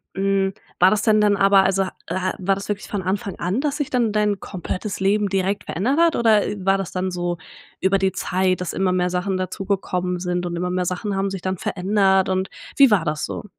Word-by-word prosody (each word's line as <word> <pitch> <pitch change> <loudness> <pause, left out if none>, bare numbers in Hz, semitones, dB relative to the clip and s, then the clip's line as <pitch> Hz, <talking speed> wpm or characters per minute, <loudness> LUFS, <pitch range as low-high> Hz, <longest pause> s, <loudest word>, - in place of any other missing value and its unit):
Hm, 195 0 +1 0.3
war 185 +1 +6
das 215 - +1
denn 215 -1 +3
dann 205 -1 +4
aber, 195 0 +5
also 195 0 +1
ha 185 - -6 0.2
äh, - - -3
ha 185 0 -1
war 195 +1 +1
das 195 +1 -6
wirklich 205 0 -3
von 205 - -3
Anfang 190 +1 -3
an, 185 +7 -1
dass 295 -1 -1
sich 290 -3 -2
dann 240 -4 +1
dein 210 -1 +1
komplettes 190 +2 -5
Leben 200 +2 +2
direkt 195 +1 -1
verändert 245 - -1
hat 335 -1 +4
oder, 220 -3 +4
äh, 205 -2 -5
war 195 +1 +3
das 195 -3 -4
dann 185 0 -2
so 175 -1 -2 0.4
über 190 +1 +2
die 190 0 +1
Zeit, 185 0 0
dass 180 - -3
immer 190 -1 +1
mehr 180 0 +1
Sachen 185 +2 -1
dazugekommen 185 -1 -2
sind 180 0 -2
und 175 0 -3
immer 180 +1 -2
mehr 180 0 -1
Sachen 190 +3 -2
haben 195 0 -1
sich 195 -2 -5
dann 185 0 -2
verändert 190 +1 +1
und 190 0 -1 0.3
wie 275 -4 +7
war 195 -5 +4
das 150 -1 -1
so? - - -6
195 Hz, 235 wpm, -22 LUFS, 185-205 Hz, 0.4 s, wie